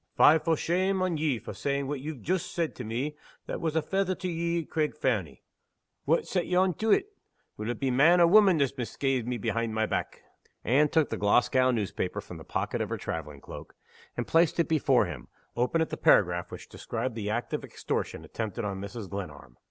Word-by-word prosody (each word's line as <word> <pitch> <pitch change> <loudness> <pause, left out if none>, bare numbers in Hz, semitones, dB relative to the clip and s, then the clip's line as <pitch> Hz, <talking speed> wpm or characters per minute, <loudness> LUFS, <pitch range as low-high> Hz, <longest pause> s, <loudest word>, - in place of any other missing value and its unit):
Fie 160 +2 +7
for 165 0 +1
shame 185 +4 +1
on 180 -3 0
ye 150 -4 +1
for 110 - -8
saying 140 0 -2
what 145 0 -3
ye've 140 -4 -7
joost 185 +1 -1
said 170 -2 -1
to 125 - -6
me 125 +7 -3 0.3
that - - -5
was 160 -1 -1
a 160 - +2
fether 190 -1 0
to 185 0 -5
ye 170 0 -1
at - - -22
Craig 150 -1 -1
Fernie! 100 - -1 0.6
Wha' 165 +3 +3
set 180 -3 -2
ye 180 - 0
on 185 0 +3
to 220 +6 -2
it? 410 - +2 0.4
Will 110 +2 -5
it 120 - -3
be 135 -2 0
man 160 +8 +5
or 170 - +7
woman 195 0 +6
that's 140 -3 +2
misca'ed 125 0 -1
me 125 -1 -1
behind 115 +1 -2
my 110 0 +2
back?" - - -3 0.4
Anne 145 +6 +3
took 160 -1 +2
the 110 - -3
Glasgow 125 +5 +3
newspaper 105 -6 -2
from - - -9
the - - -10
pocket - - -2
of - - -2
her - - -2
traveling 75 -3 -5
cloak, - - -10 0.4
and - - -1
placed 165 0 +3
it 170 - +3
before 135 -7 +3
him, 75 -9 -7 0.3
open 125 +7 +1
at 160 - -1
the - - -3
paragraph 90 -2 +3
which - - -9
described 120 +2 -4
the 105 -2 -4
act 120 +3 -2
of - - -2
extortion - - -4
attempted 110 0 -4
on 95 -1 -3
Mrs. 100 +1 -6
Glenarm. 75 -11 -8
135 Hz, 215 wpm, -28 LUFS, 110-165 Hz, 0.6 s, Fie